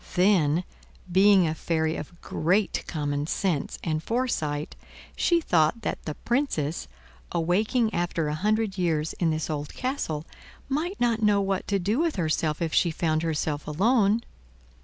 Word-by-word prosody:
Then, 180 -4 +3 0.5
being 190 0 +6
a 155 - 0
fairy 160 0 -1
of 170 +3 -8
great 185 +6 0
common 145 -2 -2
sense 170 -5 -1
and 155 -2 -1
foresight, 160 -10 -2 0.4
she 345 -1 +3
thought 175 - +2
that - - -3
the 155 - -4
Princess, 175 - -1 0.4
awakening 210 +7 +1
after 170 -2 -1
a 150 - -1
hundred 210 +3 0
years 160 -3 0
in 170 - +2
this 155 -1 -1
old 150 -2 -4
castle, 250 - -2 0.4
might 325 +8 -2
not 230 -2 +1
know 210 -1 +4
what 195 -1 -1
to 200 - +1
do 205 +7 0
with 330 -1 +1
herself 155 -2 0
if 160 - -2
she 175 - +4
found 160 -1 0
herself 155 -2 -2
alone. 210 - +3
175 Hz, 150 wpm, -26 LUFS, 155-215 Hz, 0.5 s, being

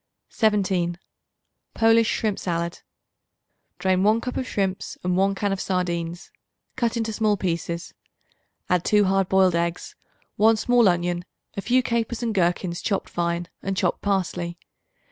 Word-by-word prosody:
17. 190 -6 +1 0.8
Polish 225 0 +4
Shrimp 215 -3 -1
Salad. 170 -1 -2 1.0
Drain 185 -1 +1
1 215 +3 +4
cup 250 +1 -5
of 255 - -2
shrimps 195 -2 -2
and 180 0 +1
1 195 +1 +2
can 200 0 -1
of 195 - -3
sardines; 175 -2 -2 0.4
cut 235 -2 0
into 225 -1 -2
small 210 -1 +1
pieces. 170 -2 -3 0.7
Add 180 -1 +2
2 210 -1 +4
hard 195 0 +1
boiled 190 -2 +4
eggs, 170 0 -2 0.4
1 220 +1 +5
small 240 -1 +4
onion, 175 0 0 0.3
a 200 - -3
few 250 +4 +2
capers 235 0 -1
and 230 -2 0
gherkins 175 -1 0
chopped 200 -3 -1
fine 170 0 -2
and 195 -1 -3
chopped 180 - 0
parsley. 175 -3 -1
190 Hz, 145 wpm, -24 LUFS, 175-215 Hz, 1.0 s, 1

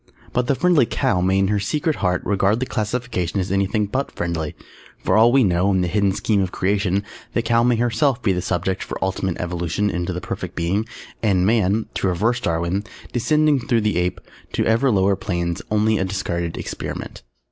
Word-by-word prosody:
_ - - -27
But 125 0 +1
the 140 - +2
"Friendly 170 -6 +3
Cow" 90 - +1
may 95 +1 +2
in 95 0 +2
her 105 -1 +1
secret 150 +9 -1
heart 90 -2 0
regard 100 +2 +2
the 130 - -1
classification 105 -6 -2
as 95 0 -2
anything 100 +2 +1
but 130 +7 -2
friendly. 85 -3 -3 0.4
For - - 0
all 115 +2 +6
we 135 0 +5
know, 90 -1 +2
in 95 -1 +2
the 90 - 0
hidden 100 +2 +2
scheme 100 +1 +1
of 95 -2 -1
Creation, 100 0 0 0.3
the 115 - +1
Cow 115 0 +3
may 120 0 +3
herself 120 +3 +1
be 100 - +3
the 90 -1 0
subject 95 +1 -1
for - - -5
ultimate 95 -1 -1
evolution 90 +3 -1
into 90 0 -2
the 90 - -3
Perfect - - -6
Being, 95 +6 0 0.3
and 95 -5 +2
Man 110 0 +2
(to - - -1
reverse 110 +7 +1
Darwin), 85 0 -1 0.3
descending 150 +3 +3
through 120 -1 +1
the 105 -4 0
Ape 90 0 -1 0.3
to - - +1
ever 115 +4 +3
lower 100 -3 +3
planes, 85 -3 -2
only 105 0 +2
a - - +1
discarded 85 -3 -3
experiment. - - -6
100 Hz, 200 wpm, -21 LUFS, 90-115 Hz, 0.4 s, all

